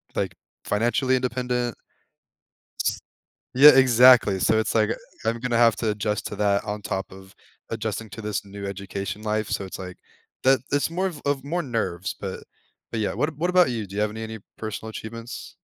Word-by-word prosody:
like, - - -1 0.3
financially 120 +5 +1
independent. 125 -1 -1 1.8
Yeah, 145 +3 +10
exactly. 125 -6 +6
So, 110 +3 +3
it's 110 - -1
like, 110 -1 +3
uh, - - -1 0.3
I'm 115 +1 0
gonna 120 -1 0
have 115 -2 +5
to 110 - -1
adjust 105 0 -2
to - - -6
that 100 -1 +2
on 105 0 -4
top 95 -2 -4
of 95 0 -14 0.3
adjusting 110 -1 -4
to 115 - -7
this 105 -1 -3
new 100 0 -8
education 100 +2 -5
life. 110 0 -1
So, 100 - -2
it's, 95 - -7
like, 90 -1 -7 0.5
that 130 0 +5
that's 145 +2 +1
more 185 +3 -1
of 160 -5 -7
of 140 -2 0
more 170 +5 -1
nerves, 100 - -2
but 95 -2 -5 0.5
but 115 - -2
yeah. 105 - -1
What 150 +8 -1
what 175 +3 0
about 180 -4 +5
you? 115 -3 -3
Do 100 0 -11
you 105 - 0
have 105 - +1
any 110 +1 -6
any 110 0 -6 0.2
personal 110 0 -5
achievements? 115 +2 -8
110 Hz, 185 wpm, -24 LUFS, 105-125 Hz, 1.8 s, Yeah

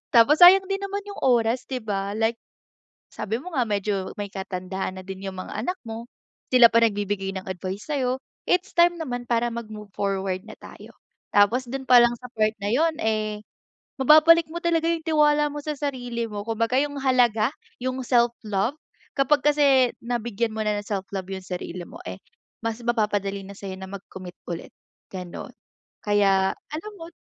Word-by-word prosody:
Tapos 290 +9 +6
sayang 380 +2 +9
din 390 0 -1
naman 395 +1 -3
yung 405 - -8
oras 240 -1 +2
'di 260 -2 -2
ba 200 -1 -2
like 225 +1 +1 0.8
sabi 220 +2 -3
mo 355 +7 -9
nga 260 - +2
medyo 200 -2 -1
may 205 -1 -4
katandaan 190 0 -4
na 185 - -9
din 190 0 -7
yung 190 -1 -5
mga - - -7
anak 360 +5 -2
mo, 230 +1 -7 0.4
sila 250 -2 +8
pa 230 - +5
nagbibigay 205 -3 0
ng 190 - -5
advice 190 +2 -5
sa'yo, 260 -4 0 0.3
it's 360 0 +1
time 345 0 +4
naman 245 -7 -5
para 235 0 +1
mag-move 215 -3 -8
forward 195 -2 -2
na - - -10
tayo. - - -13 0.3
Tapos 235 +5 +3
dun 265 +1 -4
palang 240 -2 +6
sa 250 +1 -11
part 215 -1 +1
na 205 0 -3
yun, 320 +5 +2
eh, 215 -1 -1 0.5
mababalik 315 +5 +7
mo 340 - -4
talaga 335 -1 +1
yung 335 - -2
tiwala 300 -2 +3
mo 295 - -8
sa 305 - -2
sarili 245 -5 -3
mo 205 -1 -6
kumbaga 230 +2 0
yung 285 -1 -2
halaga, 240 -5 +3 0.3
yung 255 +1 -3
self-love, 235 -1 +1 0.4
kapag 275 +1 +3
kasi 275 -4 +4
nabigyan 235 -2 -2
mo 220 - -4
na 210 -1 0
ng 205 - -12
self 195 -2 -3
love 190 -1 -4
yung 190 -1 -6
sarili 180 -1 -5
mo, - - -12
eh, - - -7 0.4
mas 230 -1 -2
mapapadali 205 -4 0
na 200 0 -10
sa'yo 190 -2 -7
na 190 - -7
mag-commit 190 -2 -9 0.2
ulit, 165 - -7 0.4
gano'n. 180 -2 -8 0.5
Kaya 195 -2 +3 0.2
alam 325 +8 -6
mo 330 - -7
230 Hz, 175 wpm, -24 LUFS, 200-270 Hz, 0.8 s, sayang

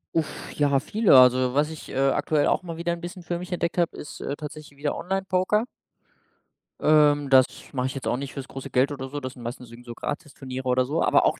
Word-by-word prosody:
Uff, 160 -3 -2
ja, 140 -2 +3
viele. 210 -1 +4
Also, 125 0 +5
was 145 +2 +2
ich, 160 -1 -9
äh, - - -7
aktuell 135 +2 +2
auch - - +1
mal 165 -2 -6
wieder 170 +1 -1
'n 170 - -7
bisschen 175 +1 -7
für 175 0 -3
mich 180 +1 -8
entdeckt 170 -1 -2
habe, 170 -2 +1
ist, 150 - -9
äh, 140 - -3
tatsächlich 150 -1 -9
wieder 145 +1 -2
Online-Poker. 190 +3 0 1.1
Ähm, 145 -2 +4
das 130 -1 +7 0.3
mache 130 -1 0
ich 130 - -6
jetzt 135 - -5
auch 125 - +1
nicht 135 -2 -6
fürs 135 -1 -6
große 135 - -8
Geld 130 +3 +2
oder 135 -2 -5
so. 145 +1 -4
Das 130 -1 -6
sind 125 - -13
meistens 120 0 -7
irgendso 120 0 -10
Gratisturniere 130 -3 -6
oder 125 0 +3
so, 155 +5 0
aber - - +4
auch - - +1
145 Hz, 225 wpm, -25 LUFS, 130-170 Hz, 1.1 s, das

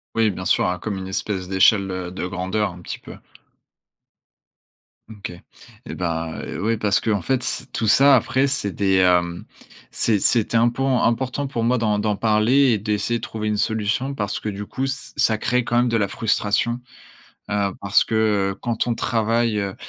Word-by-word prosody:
Oui, 115 -1 +3
bien 95 -2 -5
sûr, 90 - +2
hein, 90 0 -1
comme 100 +2 -4
une 95 - -6
espèce 95 -1 -3
d'échelle, 95 +1 +3
heu, 90 -1 -4
de 90 -1 -4
grandeur, 95 +3 -2
un 90 - -12
petit - - -7
peu. - - -11 1.9
Mmh 110 - -10
OK 100 - -6 0.6
et - - -6
ben, 80 -2 -3
heu, - - -5
ouais, 115 +1 +1
parce 105 -2 +1
qu'en 105 -4 0
fait, 130 +7 -1
c - - -3
tout 110 - -1
ça 135 +6 +6
après, 130 +2 +2
c'est 130 -7 -1
des, 95 0 +1
hem, 90 -2 +2 0.5
c'est 110 -3 +1
c'était 115 +2 +2
impor 120 +2 +2
important 130 +4 0
pour 115 -4 -3
moi 125 +2 +2
d'en 105 -3 0
d'en 105 0 0
parler 115 +6 +3
et 110 - +2
d'essayer 105 +3 -1
de - - -15
trouver 110 -1 -4
une 105 - 0
solution 110 +5 -1
parce 105 -4 -3
que 105 - -4
du 100 +1 -6
coup, 135 +5 -3
ç 135 +1 -4
ça 110 -1 +2
crée 125 +3 0
quand 120 0 -1
même 120 0 +3
de 115 - +1
la 100 - +1
frustration. 110 +3 0 0.7
Heu, 100 -1 0
parce 100 0 +3
que, - - -6 0.4
heu, - - -15
quand 120 -2 -1
on 120 - +1
travaille, 115 0 0
heu, 100 -1 -3
110 Hz, 195 wpm, -22 LUFS, 100-120 Hz, 1.9 s, ça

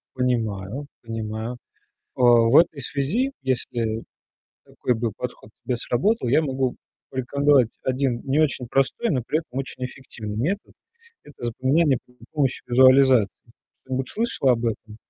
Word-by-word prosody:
Понимаю, 120 0 -2
понимаю, 115 +1 -5 0.6
а. - - -3
В 120 +1 +6
этой 160 -4 +4
связи, 180 - -1
если 120 -3 -2 0.6
такой 125 - -1
бы 115 0 -1
подход 125 -3 -7
к - - -54
тебе 125 - 0
сработал, 125 - 0
я 150 +6 +4
могу 130 -3 -1 0.3
порекомендовать 135 0 +3
один 130 -2 0
не 140 +2 +1
очень 135 -5 0
простой, 135 - +1
но 130 -5 0
при 155 - +1
этом 145 -5 -7
очень 130 -1 -5
эффективный 115 -5 -7
метод. 180 - -2 0.5
Это 135 -4 -11
запоминание 130 +4 +2
при 125 - -25 0.2
помощи 140 -4 0
визуализации. 130 -3 +4 0.3
Что-нибудь 130 0 -3
слышала 220 - +1
об 120 0 -1
этом? 110 -1 -4
130 Hz, 140 wpm, -24 LUFS, 120-140 Hz, 0.6 s, В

